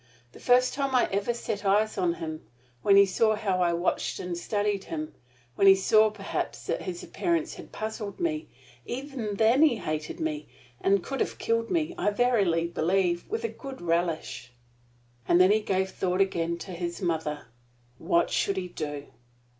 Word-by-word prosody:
The - - -14
first 250 0 +4
time 275 -1 -1
I 250 - +4
ever 200 +4 0
set 215 -3 -4
eyes 210 +2 +2
on 180 -3 +1
him, 160 -1 -6 0.4
when 200 - +5
he 200 0 +8
saw 215 +3 +2
how 195 -4 -1
I 170 -1 +3
watched 170 +2 -1
and 180 -1 -4
studied 205 +2 -1
him 310 -1 -5 0.4
when 195 - +3
he 195 - +9
saw 215 +3 +4
perhaps 215 - -4
that - - -2
his 360 -2 -5
appearance 335 -1 -1
had - - -11
puzzled 215 -2 -5
me 320 -2 -1 0.4
even 250 -5 -4
then 225 +6 +4
he 310 -6 +5
hated 155 -6 -4
me 155 -1 -3 0.3
and 195 -1 +2
could 270 -1 -4
have - - -1
killed 230 0 0
me, 335 -1 0
I - - +2
verily 205 -7 +2
believe, 175 - 0
with 445 +3 -3
a - - +1
good 270 -10 -9
relish." 165 -7 -2 0.8
And 175 - +5
then 185 +2 +6
he 215 - +4
gave 190 -2 -1
thought 185 0 -1
again 170 -3 +1
to 185 - -8
his 170 -1 -4
mother. 160 - -2 0.5
What 170 +1 +1
should 195 - 0
he 180 -1 -3
do? 145 -4 -5
195 Hz, 180 wpm, -27 LUFS, 170-235 Hz, 0.8 s, he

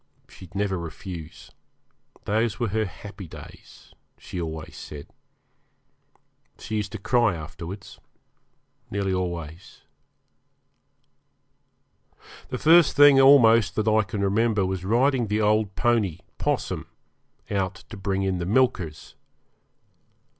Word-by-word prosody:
She'd 95 0 -15
never 100 -2 -1
refuse; 85 0 -9 0.7
those 110 +2 0
were 120 -3 0
her 110 +2 0
happy 100 0 -10
days, - - -14 0.2
she 90 - -6
always 80 -1 -6
said. 70 -1 -9 1.5
She 110 - -4
used 105 -1 -3
to - - -3
cry 110 -1 +2
afterwards 85 +4 -9 0.9
nearly 100 -1 -1
always. 85 -2 -5 2.7
The 125 - -3
first 165 +3 +5
thing 145 -1 +7
almost 115 -7 +6
that 110 0 -1
I 110 0 +4
can 105 0 -4
remember 105 0 +1
was 95 -1 -3
riding 120 +4 +2
the 105 +1 0
old 105 -2 +1
pony, 105 -5 +1 0.2
'Possum, - - -2 0.6
out 95 -1 -2
to - - -6
bring 95 0 -2
in 95 -2 -1
the 85 - -3
milkers. 95 - 0
100 Hz, 110 wpm, -25 LUFS, 90-110 Hz, 2.7 s, thing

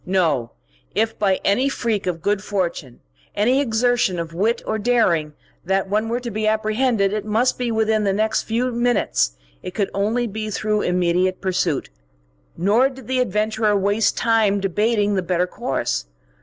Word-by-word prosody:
No; 165 -11 +1 0.5
if 225 0 0
by 195 -2 +2
any 255 +8 +2
freak 225 -7 -2
of 165 -3 -3
good 205 -1 0
fortune, 170 -11 -3 0.3
any 250 +6 +3
exertion 235 -6 +1
of 165 -1 -5
wit 215 +7 0
or 220 - -2
daring, 190 -10 +2 0.3
that 195 +2 0
one 215 +3 0
were 235 +1 -1
to 240 -1 -5
be 215 +1 -1
apprehended, 215 -1 +1
it 215 - -2
must 225 +5 +1
be 245 -2 -1
within 220 -1 +1
the 200 - +2
next 220 +2 +1
few 245 +3 -1
minutes, 230 - +1 0.3
it 180 - -8
could 200 -3 -1
only 220 +5 0
be 215 0 -4
through 210 0 -1
immediate 180 +1 +1
pursuit. 180 -6 -1 0.7
Nor 215 +9 +3
did 265 -2 -12
the 260 0 0
adventurer 215 -1 +1
waste 205 +2 +1
time 220 -3 +2
debating 205 +2 +1
the 190 - +1
better 180 0 0
course. - - -2
210 Hz, 165 wpm, -21 LUFS, 185-225 Hz, 0.7 s, any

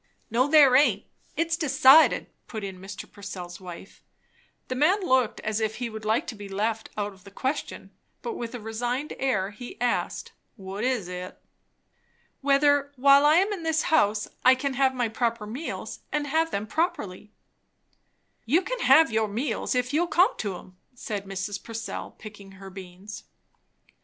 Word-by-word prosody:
"No 250 +4 +3
there 290 -4 +6
aint; 245 -8 +4 0.3
it's 330 0 +1
decided," 305 -1 +5 0.2
put 220 -3 -6
in 190 -2 -6
Mr. 195 +1 -8
Purcell's 185 -3 -8
wife. 180 +1 -11 0.7
The - - -3
man 310 +10 +3
looked 255 -6 +2
as 215 0 -2
if 220 -1 -1
he 240 -2 -4
would 220 0 -8
like 220 +2 +1
to - - -5
be 205 -1 -9
left 215 +3 -2
out 205 -1 -2
of 190 -1 -20
the 200 - -12
question; 260 +8 -4 0.3
but 470 - -3
with 240 - -6
a - - -5
resigned 240 +6 -3
air 205 -8 0
he 240 +4 -10
asked, 245 0 -1 0.2
"What 195 0 -6
is 250 -7 0
it?" 180 0 -7 1.0
"Whether, 285 0 +3
while 280 +2 +6
I 305 - +6
am 390 +4 +3
in 385 - -5
this 320 -1 0
house, 210 -8 +3 0.2
I 255 +1 +7
can 275 +1 -2
have 265 0 +2
my 245 -2 0
proper 230 -1 -2
meals, 250 +10 -6
and 295 -1 -1
have 320 +3 +1
them 205 -7 -3
properly." 210 - -3 1.1
"You 315 +11 +2
can - - -4
have 310 - +6
your 220 -1 +1
meals, 240 +5 -2
if 250 +2 0
you'll 340 +4 +2
come 360 +2 +3
to 200 -4 -3
'em," 185 0 -15 0.2
said 210 -4 -5
Mrs. 195 +1 -4
Purcell, 225 0 -6
picking 205 -2 -12
her 195 0 -11
beans. 190 +2 -10
235 Hz, 170 wpm, -26 LUFS, 205-280 Hz, 1.1 s, I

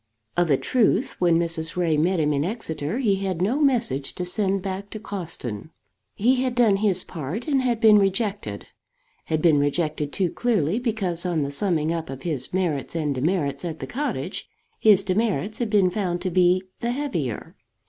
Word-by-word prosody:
Of 175 -1 +2
a 140 - +4
truth 255 - +1
when 175 -2 +4
Mrs. 165 -1 -2
Ray 170 -3 +1
met 170 +4 +2
him 150 -1 +2
in 140 0 +1
Exeter 165 -3 -3
he 215 -7 +2
had 190 -3 -2
no 220 +11 +1
message 230 - +1
to 180 - -3
send 195 0 0
back 195 +1 -4
to 215 - -7
Cawston. 165 - -6 0.5
He 250 +5 +2
had 255 -2 -1
done 225 -5 +4
his 195 -3 +2
part, 165 - -5
and 275 -3 +2
had 240 -3 0
been 215 -2 +7
rejected; 200 +1 -1 0.6
had 155 -1 -1
been 160 -4 +5
rejected 150 0 -1
too 180 -1 0
clearly 215 -5 +1
because 200 -8 -1
on 170 -5 0
the 140 - -3
summing 160 -1 0
up 165 -1 -4
of 135 0 -7
his 150 -7 -2
merits 170 -6 -1
and 150 -3 0
demerits 140 0 -1
at 165 -2 -4
the - - -6
cottage, 290 +4 -3 0.3
his 205 -3 +5
demerits 205 0 -1
had 235 -3 -1
been 200 -4 +3
found 180 -3 -1
to 185 0 -2
be 180 +1 +3 0.2
the 235 +1 -1
heavier. 175 - -3
185 Hz, 185 wpm, -24 LUFS, 160-215 Hz, 0.6 s, been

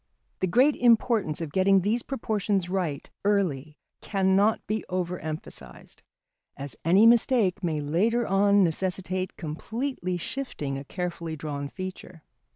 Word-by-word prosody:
The 185 - +1
great 255 - +4
importance 230 -9 +2
of 160 -3 -4
getting 190 +2 +4
these 215 +6 +1
proportions 210 -8 -1
right 175 -7 -2 0.2
early 160 -8 0 0.2
cannot 195 +2 +2
be 215 +1 -2
over 180 -1 -2
emphasised, 155 0 -8 0.6
as 140 -4 -6
any 185 +7 +5
mistake 230 -5 +4
may 160 -3 -1
later 210 +11 +1
on 200 0 +4
necessitate 185 +2 -2
completely 185 - -3
shifting 170 - -4
a 135 - -5
carefully 170 -1 -4
drawn 145 -2 -5
feature. 185 -3 -8
185 Hz, 125 wpm, -26 LUFS, 160-210 Hz, 0.6 s, any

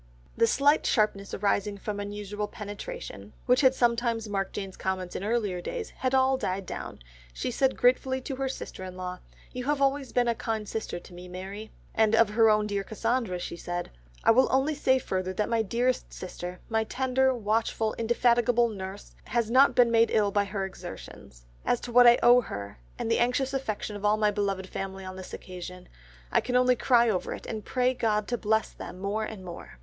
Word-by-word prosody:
The 230 - +4
slight 285 +6 +3
sharpness 205 -3 +1
arising 205 0 0
from 205 +1 -4
unusual 205 0 -4
penetration, 200 - -8
which 250 +2 +4
had 260 -1 +5
sometimes 235 -2 +1
marked 195 -2 -2
Jane's 195 -2 -5
comments 185 -1 -3
in - - -3
earlier 205 -5 -1
days, 455 - -5
had 260 0 -1
all 265 0 +4
died 190 -5 -2
down, - - -6 0.4
she - - -2
said 265 +2 +1
gratefully 260 +1 +3
to 265 0 -5
her 270 0 -1
sister 190 - -7
in 185 0 -8
law, 180 0 -5 0.3
"You 250 0 -5
have 290 0 +1
always 275 -1 +1
been 245 -1 +2
a 235 - +3
kind 220 -2 -3
sister 215 -5 -4
to 180 - -15
me, 180 +1 -10
Mary," 195 +4 -7 0.2
and 220 0 +3
of 225 -2 +5
her 225 +1 +5
own 210 0 +3
dear 200 -1 -2
Cassandra 225 -2 -1
she 175 - -5
said, 175 +1 -5 0.3
"I - - +6
will 260 +3 +5
only 270 +4 +2
say 265 -3 +3
further 185 -6 -2
that 210 +3 -1
my 230 -1 +2
dearest 240 +4 0
sister, 180 0 -7
my 225 -1 +1
tender, 260 +2 +1
watchful, 220 0 0
indefatigable 235 +1 +3
nurse, 195 -1 -8
has 235 -2 -1
not 265 +3 +6
been 240 -2 +5
made 230 0 +4
ill 205 -2 +2
by 205 0 +2
her 195 -1 -3
exertions. 60 - -10 0.2
As 245 - +1
to 245 - -6
what 245 +1 +7
I 240 - +8
owe 245 +1 +7
her, 100 - -7 0.2
and 225 - -2
the - - +3
anxious 255 +3 +1
affection 220 -5 -3
of 205 - -8
all 210 +1 +3
my 210 -1 +3
beloved 195 -2 -2
family 195 0 -5
on 185 0 -7
this 185 0 -9
occasion, 180 0 -8 0.4
I - - +3
can 250 - -3
only 250 0 +5
cry 240 -1 +4
over 195 -5 -1
it, - - -11
and 215 -2 -5
pray 255 +3 +1
God 215 -4 0
to 240 - 0
bless 220 0 +1
them - - -9
more 200 +3 -1
and 210 -4 -8
more." 170 - -9
220 Hz, 205 wpm, -28 LUFS, 195-245 Hz, 0.4 s, I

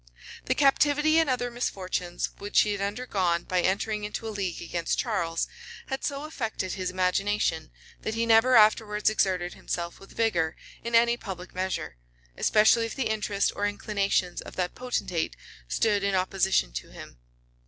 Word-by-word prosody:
[] - - -14
The 255 - +1
captivity 295 +3 +4
and 320 -3 +2
other 245 -1 0
misfortunes 185 -7 -3
which 205 +1 +3
he 210 - +1
had 200 -1 -3
undergone 200 -5 0
by 185 -1 0
entering 210 +3 0
into 210 +2 -4
a 220 - -4
league 190 -5 -3
against 170 0 -2
Charles, 170 -8 -1 0.4
had 265 -1 -3
so 280 0 -2
affected 225 - -3
his 185 -1 -2
imagination, 185 -3 0 0.3
that 220 - -3
he 230 +1 +1
never 230 +3 +5
afterwards 215 -1 +4
exerted 185 -4 0
himself 170 0 -4
with 195 - -15
vigor 170 -8 +1 0.3
in 235 0 -1
any 235 +1 +5
public 185 -4 -8
measure; 185 - -3 0.4
especially 225 +2 +4
if - - -7
the 260 -5 -1
interest 210 -2 0
or 205 - 0
inclinations 200 -3 -1
of - - -10
that 180 -1 -1
potentate 240 -9 -2 0.3
stood 205 - +1
in 200 -1 +1
opposition 185 - +1
to - - -6
him. - - -12
205 Hz, 165 wpm, -27 LUFS, 180-230 Hz, 0.4 s, never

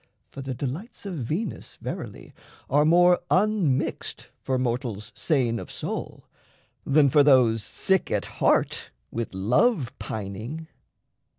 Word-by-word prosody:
For 135 - -7
the 135 -1 -4
delights 145 - -5
of 195 - -4
Venus, 160 - -4
verily, - - -7 0.4
Are 145 +2 +4
more 175 +2 +5
unmixed 185 -9 0
for 130 -1 0
mortals 120 -4 -2
sane 125 -7 0
of - - -8
soul - - -5 0.6
Than 145 +1 +4
for 145 +2 +5
those 125 -6 +5
sick 190 - 0
at - - 0
heart - - +1 0.2
with 115 -2 -3
love 125 - +2
pining. 110 +10 -5
135 Hz, 120 wpm, -26 LUFS, 120-170 Hz, 0.6 s, more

